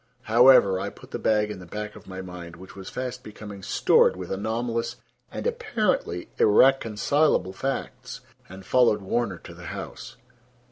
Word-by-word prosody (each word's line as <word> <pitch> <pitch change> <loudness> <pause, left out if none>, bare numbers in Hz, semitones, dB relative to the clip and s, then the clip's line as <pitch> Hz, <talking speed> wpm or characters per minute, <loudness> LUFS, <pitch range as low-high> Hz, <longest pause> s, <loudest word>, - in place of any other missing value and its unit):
However, 115 -5 +6
I 100 +1 -3
put - - -16
the - - -4
bag 105 -1 +1
in 100 - -7
the 90 - -11
back 105 +3 -6
of - - -14
my 95 0 -7
mind, 90 -2 -9
which 95 +2 -13
was 95 -1 -8
fast 125 -1 -5
becoming 105 -2 -10
stored 95 - +3
with 90 -1 -7
anomalous 115 +3 -2 0.4
and - - -6
apparently 235 - -1
irreconcilable 120 -1 +3
facts, 135 +7 -5 0.3
and 95 +1 -11
followed 120 -5 +3
Warner 100 -1 -1
to - - -12
the - - -12
house. - - -8
105 Hz, 155 wpm, -25 LUFS, 95-125 Hz, 0.4 s, However